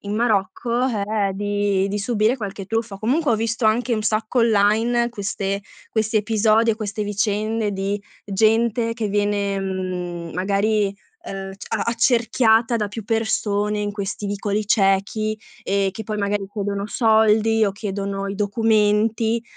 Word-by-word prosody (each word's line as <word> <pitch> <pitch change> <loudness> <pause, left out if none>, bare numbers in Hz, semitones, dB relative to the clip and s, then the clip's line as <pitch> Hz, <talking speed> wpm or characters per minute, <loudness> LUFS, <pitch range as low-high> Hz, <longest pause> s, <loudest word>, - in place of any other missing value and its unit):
in 205 +1 -4
Marocco, 230 +3 0
ehm, 205 -3 -1
di 205 -1 0
di 205 +1 -2
subire 220 +3 +1
qualche 200 -2 -5
truffa. 225 0 -2
Comunque 260 +7 +1
ho 220 - +2
visto 225 +1 0
anche 235 +3 +2
un 215 - +1
sacco 220 +3 0
online 230 +2 +3
queste 200 -2 -3 0.3
questi 220 0 0
episodi 220 +1 +3
e 215 - -1
queste 210 -1 -3
vicende 210 +1 -1
di 200 +1 -2 0.2
gente 225 +3 +2
che 225 -3 -2
viene, 205 -1 0
mhmm, 180 -3 -4
magari, 200 +2 0 0.3
ehm, 195 0 -6
c - - -10
a - - -1
accerchiata 230 0 +3
da 210 -2 -1
più 215 +1 -7
persone 210 -2 0
in 205 0 -2
questi 200 0 -4
vicoli 205 +1 -1
ciechi, 210 +1 +1 0.2
e 195 0 +1
che 220 +3 -7
poi 215 -1 -3
magari 200 -1 -1
chiedono 200 -1 -3
soldi 220 -1 +3
o 195 - -1
chiedono 200 -1 -4
i 195 - -4
documenti 220 +2 +2
210 Hz, 145 wpm, -22 LUFS, 200-225 Hz, 0.3 s, online